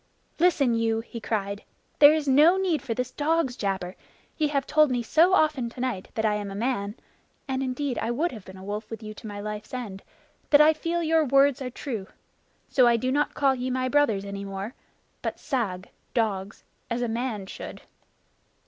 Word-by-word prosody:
"Listen 305 -8 +3
you!" 225 -1 +1
he 230 0 -9
cried. 205 -2 -2 0.4
"There 290 0 +10
is 310 -2 0
no 300 +7 +6
need 360 -7 +1
for 230 -3 -3
this 250 +1 -2
dog's 300 -4 0
jabber. 190 -4 -3 0.4
Ye 310 - +1
have 280 -2 0
told 305 -1 +4
me 245 -2 0
so 335 +10 +4
often 305 -8 +2
tonight 245 -5 -3
that 220 - 0
I 215 - +3
am 205 -1 -3
a 195 - -7
man 210 -2 -1 0.5
(and 265 -1 -1
indeed 260 0 -2
I 225 - -2
would 305 +9 0
have 215 -5 -9
been 190 0 -12
a 190 - -11
wolf 210 +2 -5
with 225 -1 -7
you 215 0 -6
to 215 - -10
my 205 -1 -6
life's 210 +3 -6
end) 205 -6 -6 0.5
that 290 - +7
I 305 +1 +7
feel 335 +2 -2
your 320 0 +3
words 275 +1 +4
are 255 - -3
true. 235 -6 -5 0.6
So 255 -3 +4
I 235 -1 +4
do 255 +3 -1
not 295 +2 0
call 275 -2 +3
ye 255 0 -3
my 255 0 0
brothers 250 -9 +2
any 200 0 -5
more, 195 +3 -5 0.5
but - - -4
sag 200 -8 -3 0.2
[dogs], 205 -4 -1 0.3
as 240 +1 -1
a - - 0
man 230 -3 -3
should. - - -8
245 Hz, 200 wpm, -26 LUFS, 210-290 Hz, 0.6 s, There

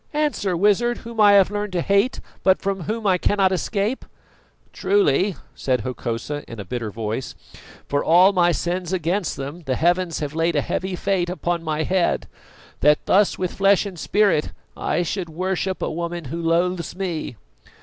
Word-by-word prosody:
Answer, 285 - 0
Wizard, 210 +6 +2
whom 230 -1 -2
I 205 -1 +7
have 200 -1 +5
learned 205 -1 -3
to 175 - 0
hate, 200 +8 +1 0.2
but 190 0 +4
from 195 -3 -3
whom 220 +1 -3
I 185 -2 +3
cannot 195 -1 +2
escape!" 200 +5 -1 0.7
"Truly," 190 -2 +2 0.2
said 125 -3 -1
Hokosa 125 +4 -4
in 115 - -9
a 100 - -6
bitter 115 +3 -4
voice, 110 +4 -4 0.5
"for 145 0 0
all 180 +4 +6
my 175 -2 +4
sins 175 +3 -2
against 180 +1 -1
them 140 +6 -6
the 130 - +1
heavens 175 +1 +1
have 145 -1 -4
laid 165 +1 0
a 145 - +3
heavy 185 +5 -3
fate 180 -1 0
upon 175 -1 -2
my 155 -1 -1
head, 185 +1 0 0.5
that 150 +3 +3
thus 200 +1 +3
with 185 -1 -2
flesh 195 +1 +3
and 190 -4 -7
spirit 200 -7 +2 0.2
I 175 - -1
should 175 0 -3
worship 185 +3 -2
a - - -1
woman 170 0 -4
who 170 - -3
loathes 170 +1 0
me. 175 -9 -4
180 Hz, 170 wpm, -22 LUFS, 160-195 Hz, 0.7 s, I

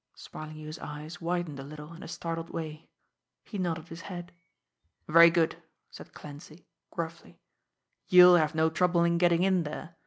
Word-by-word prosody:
Smarlinghue's 155 0 -9
eyes 150 +4 -8
widened 170 -4 -3
a - - -6
little 150 +3 -10
in 170 - -12
a - - -8
startled 165 0 -5
way. 155 -1 -7 0.5
He 205 - -7
nodded 165 -3 -3
his 165 0 -9
head. 175 +1 -8 0.8
"Very 165 +2 +8
good," 165 -1 0 0.3
said - - -12
Clancy 150 +3 -12 0.2
gruffly. 165 0 -7 0.7
"You'll 180 0 +8
have 155 -1 0
no 160 0 +2
trouble 175 0 +2
in 170 0 +2
getting 175 0 +3
in 190 -2 +3
there. 160 +2 -7
165 Hz, 155 wpm, -29 LUFS, 155-175 Hz, 0.8 s, Very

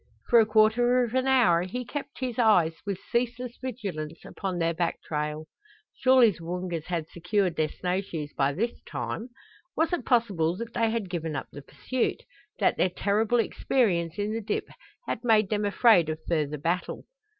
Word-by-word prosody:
For 235 - +7
a 220 - +4
quarter 235 +3 +4
of 235 -1 -4
an 260 0 +1
hour 235 -11 +4
he 245 +8 -4
kept 280 +2 -7
his 250 -2 -3
eyes 180 -8 +4
with 200 -2 -1
ceaseless 245 0 -1
vigilance 190 -11 -5
upon 190 -2 -4
their 165 -1 +1
back 170 0 -1
trail. 150 0 -3 0.5
Surely 255 -3 +5
the 170 - -12
Woongas 175 -1 -4
had 170 -3 -2
secured 180 +1 -1
their 155 -1 +1
snow 180 +1 -2
shoes 160 -7 -6
by 140 0 +1
this 230 +9 -2
time! 230 +3 -4 0.5
Was 325 +3 +1
it 350 - -1
possible 195 -9 +1
that 230 +1 -6
they 230 -1 +1
had 225 -3 -2
given 165 -4 -4
up 135 - -5
the 145 - -9
pursuit 255 - -3 0.3
that - - +2
their 185 - +3
terrible 210 +5 +1
experience 185 -8 0
in 205 +1 -1
the 225 - -2
dip 210 - -3 0.4
had 230 - -4
made 220 -4 +3
them 210 -1 0
afraid 200 -5 +4
of 155 - -2
further 150 -3 0
battle? 170 +5 -2
200 Hz, 180 wpm, -27 LUFS, 170-235 Hz, 0.5 s, For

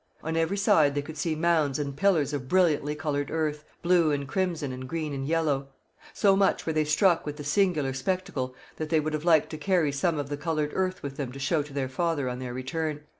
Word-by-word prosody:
On 160 +1 -2
every 165 +4 +1
side 165 -9 +4
they 145 - 0
could 160 +1 -8
see 155 +1 -1
mounds 155 -4 +2
and 140 -2 -3
pillars 155 -4 +2
of 135 -3 -3
brilliantly 150 -3 +2
coloured 145 -2 -2
earth, 155 -2 -1 0.2
blue 170 -2 +4
and 140 -2 -1
crimson 170 -4 -1
and 130 0 -7
green 155 -2 -3
and 135 0 -3
yellow. 150 -4 0 0.4
So 195 -2 +3
much 195 0 +2
were 160 - -1
they 155 0 +2
struck 165 +3 +3
with 150 0 -5
the 145 - -6
singular 150 -3 +1
spectacle 130 -4 -2 0.2
that 155 -1 -4
they 160 -1 +3
would 155 +1 -2
have 155 +1 -3
liked 160 -3 +4
to 155 - -6
carry 175 -5 +2
some 155 +4 0
of 145 -1 -3
the 145 - -3
coloured 155 -1 -1
earth 185 0 -1
with 140 -1 -6
them 135 -4 -3
to 140 - -8
show 150 +3 +1
to 145 0 -9
their 135 -2 -1
father 145 0 -1
on 125 0 -4
their 125 -1 -5
return. 150 +4 -3
150 Hz, 230 wpm, -27 LUFS, 140-165 Hz, 0.4 s, side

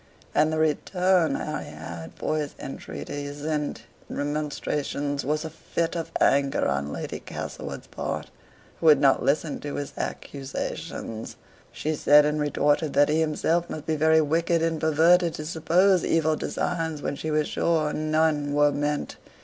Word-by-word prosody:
And 155 +1 +3
the 160 - -1
return 180 +3 +2
Harry 155 0 -4
had 80 +1 -8
for 155 - -1
his 145 -1 -4
entreaties 145 +1 -6
and 150 -2 -1 0.3
remonstrances 145 -1 -2
was 155 +3 -1
a - - -4
fit 165 +1 -3
of 165 -1 -4
anger 140 0 +3
on 70 +1 -1
Lady - - -5
Castlewood's - - -6
part, - - -5 0.5
who 165 - +1
would 150 - +8
not 135 -1 +4
listen 150 +1 0
to 145 - -5
his 145 -1 -4
accusations; 130 -4 -5 0.4
she 155 - -2
said 150 0 +6
and 150 0 0
retorted 145 +1 +1
that 145 +1 +4
he 155 +1 +2
himself 160 +2 +1
must 155 - -6
be 160 - 0
very 160 +1 +4
wicked 165 +2 +1
and 165 -1 0
perverted 165 +2 +4
to 155 - -6
suppose 175 +4 +3
evil 160 -1 +2
designs 160 -1 -2
where - - -2
she 155 - -4
was 155 -1 +1
sure 155 -3 +1
none 155 -2 +1
were 145 0 +5
meant. 145 +1 -2
155 Hz, 155 wpm, -26 LUFS, 145-160 Hz, 0.5 s, would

